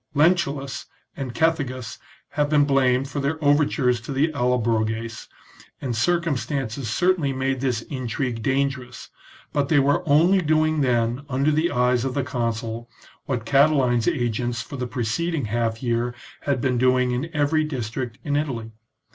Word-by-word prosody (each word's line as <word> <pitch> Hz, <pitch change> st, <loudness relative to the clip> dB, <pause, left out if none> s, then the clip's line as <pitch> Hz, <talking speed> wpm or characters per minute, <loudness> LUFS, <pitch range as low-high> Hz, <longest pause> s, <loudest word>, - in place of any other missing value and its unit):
Lentulus 145 Hz, -4 st, +1 dB, 0.3 s
and 130 Hz, -3 st, -5 dB
Cethegus 135 Hz, -9 st, -1 dB, 0.3 s
have 145 Hz, 0 st, 0 dB
been 145 Hz, -1 st, +4 dB
blamed 135 Hz, -1 st, +2 dB
for 145 Hz, +1 st, -4 dB
their 140 Hz, +3 st, -1 dB
overtures 140 Hz, -4 st, +3 dB
to 115 Hz, -, -7 dB
the 140 Hz, +4 st, +2 dB
Allobroges, 115 Hz, -3 st, 0 dB, 0.5 s
and 125 Hz, -4 st, -3 dB
circumstances 135 Hz, -4 st, -1 dB
cer 180 Hz, +11 st, +3 dB
tainly 140 Hz, -7 st, -2 dB
made 130 Hz, 0 st, 0 dB
this 125 Hz, -4 st, 0 dB
intrigue 125 Hz, -3 st, -3 dB
dangerous, 135 Hz, 0 st, -2 dB, 0.4 s
but 140 Hz, -1 st, 0 dB
they 160 Hz, -, +4 dB
were 140 Hz, +3 st, +3 dB
only 170 Hz, +7 st, +5 dB
doing 155 Hz, -1 st, +2 dB
then 120 Hz, 0 st, +1 dB
under 140 Hz, +3 st, +2 dB
the 155 Hz, +3 st, +2 dB
eyes 125 Hz, 0 st, +2 dB
of 130 Hz, -1 st, -2 dB
the 140 Hz, -, +1 dB
consul 115 Hz, -3 st, -3 dB, 0.4 s
what 125 Hz, -5 st, -2 dB
Catiline's 130 Hz, -2 st, +3 dB
agents 120 Hz, -5 st, 0 dB
for 140 Hz, -, -9 dB
the 125 Hz, -2 st, -3 dB
preceding 135 Hz, +6 st, -1 dB
half 115 Hz, +2 st, -1 dB
year 120 Hz, 0 st, 0 dB, 0.3 s
had 140 Hz, -3 st, +1 dB
been 125 Hz, -1 st, +1 dB
doing 125 Hz, 0 st, +3 dB
in 130 Hz, +7 st, -2 dB
every 155 Hz, +1 st, +2 dB
district 125 Hz, -4 st, -4 dB
in 145 Hz, -1 st, -1 dB
Italy. 125 Hz, -7 st, -2 dB
130 Hz, 150 wpm, -23 LUFS, 120-145 Hz, 0.5 s, only